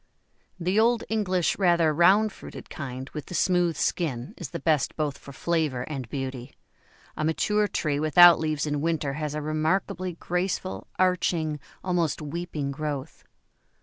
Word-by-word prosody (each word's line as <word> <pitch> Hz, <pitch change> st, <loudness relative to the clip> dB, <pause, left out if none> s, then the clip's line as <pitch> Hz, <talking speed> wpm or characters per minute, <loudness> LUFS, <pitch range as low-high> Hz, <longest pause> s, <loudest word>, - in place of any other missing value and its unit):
The 185 Hz, +4 st, +1 dB
old 230 Hz, +1 st, +3 dB
English 185 Hz, -6 st, 0 dB
rather 170 Hz, -4 st, +3 dB
round 195 Hz, +7 st, +5 dB
fruited -, -, -11 dB
kind 130 Hz, -2 st, -6 dB
with 150 Hz, -2 st, -7 dB
the 180 Hz, -, -6 dB
smooth 175 Hz, -3 st, +2 dB
skin 135 Hz, -7 st, -2 dB
is 170 Hz, -, -7 dB
the -, -, -5 dB
best 155 Hz, -1 st, +1 dB
both 150 Hz, -3 st, -1 dB
for 140 Hz, -, -11 dB
flavour 155 Hz, -4 st, -1 dB
and 130 Hz, -5 st, -6 dB
beauty 130 Hz, -1 st, -5 dB, 0.6 s
a -, -, -3 dB
mature 210 Hz, +7 st, +1 dB
tree 150 Hz, -6 st, -1 dB
without 170 Hz, +3 st, +7 dB
leaves 155 Hz, -2 st, -1 dB
in 145 Hz, -1 st, -1 dB
winter 155 Hz, -3 st, -1 dB
has 150 Hz, 0 st, -3 dB
a 150 Hz, -, -3 dB
remarkably 165 Hz, +4 st, -1 dB
graceful, 180 Hz, +2 st, -3 dB
arching, 170 Hz, -4 st, +1 dB, 0.2 s
almost 175 Hz, -4 st, 0 dB
weeping 150 Hz, -2 st, -4 dB
growth. 145 Hz, 0 st, -5 dB
160 Hz, 150 wpm, -26 LUFS, 145-180 Hz, 0.6 s, without